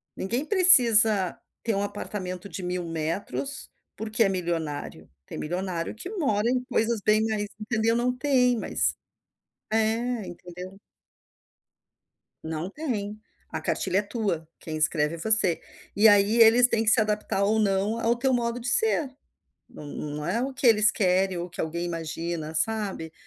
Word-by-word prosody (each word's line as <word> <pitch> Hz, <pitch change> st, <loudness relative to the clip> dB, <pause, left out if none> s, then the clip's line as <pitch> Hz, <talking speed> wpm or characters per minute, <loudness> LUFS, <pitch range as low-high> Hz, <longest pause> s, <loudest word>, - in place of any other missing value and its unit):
Ninguém 235 Hz, +8 st, -2 dB
precisa 230 Hz, -, +5 dB, 0.2 s
ter 225 Hz, -3 st, -1 dB
um 200 Hz, -, 0 dB
apartamento 200 Hz, -2 st, -5 dB
de 190 Hz, -, -7 dB
1000 180 Hz, 0 st, -3 dB
metros, 165 Hz, -, -4 dB, 0.3 s
porque 220 Hz, +2 st, 0 dB
é 200 Hz, -, +2 dB
milionário. 165 Hz, -6 st, -4 dB, 0.2 s
Tem -, -, -8 dB
milionário 175 Hz, +1 st, -3 dB
que 230 Hz, +11 st, -8 dB
mora 255 Hz, -, 0 dB
em 250 Hz, 0 st, 0 dB
coisas 235 Hz, -3 st, 0 dB
bem 215 Hz, +1 st, +4 dB
mais, 215 Hz, -2 st, -1 dB
entendeu, 225 Hz, +1 st, 0 dB
não 245 Hz, +1 st, 0 dB
tem, 250 Hz, -2 st, +2 dB
mas, -, -, 0 dB, 0.8 s
eh, 225 Hz, 0 st, 0 dB
entendeu. 180 Hz, +2 st, -10 dB, 1.6 s
Não 160 Hz, +2 st, -4 dB
tem. 215 Hz, -6 st, -4 dB, 0.3 s
A -, -, -4 dB
cartilha 190 Hz, +1 st, 0 dB
é -, -, +1 dB
tua, 205 Hz, -6 st, -3 dB
quem 155 Hz, -, -6 dB
escreve 155 Hz, 0 st, +1 dB
é -, -, -9 dB
você. 200 Hz, -2 st, +1 dB, 0.3 s
E 210 Hz, +2 st, +6 dB
aí 205 Hz, +1 st, +5 dB
eles 230 Hz, +2 st, +7 dB
têm 225 Hz, -2 st, 0 dB
que 215 Hz, -, +3 dB
se 230 Hz, -, +5 dB
adaptar 210 Hz, -2 st, 0 dB
ou 210 Hz, +2 st, +2 dB
não 205 Hz, +2 st, +1 dB
ao 230 Hz, +1 st, +2 dB
teu 260 Hz, +2 st, +1 dB
modo 240 Hz, 0 st, -1 dB
de 240 Hz, -, -6 dB
ser. 320 Hz, -, +2 dB, 0.6 s
Não 150 Hz, -, -11 dB
não 150 Hz, +1 st, -5 dB
é 210 Hz, +8 st, 0 dB
o 270 Hz, +1 st, -4 dB
que 255 Hz, 0 st, +1 dB
eles 215 Hz, -2 st, +5 dB
querem 185 Hz, -1 st, +1 dB
ou 170 Hz, -, -3 dB
o -, -, -12 dB
que 175 Hz, -, -5 dB
alguém 170 Hz, +2 st, -3 dB
imagina, 165 Hz, -1 st, -4 dB
sabe. 195 Hz, -4 st, -2 dB
210 Hz, 160 wpm, -26 LUFS, 180-230 Hz, 1.6 s, eles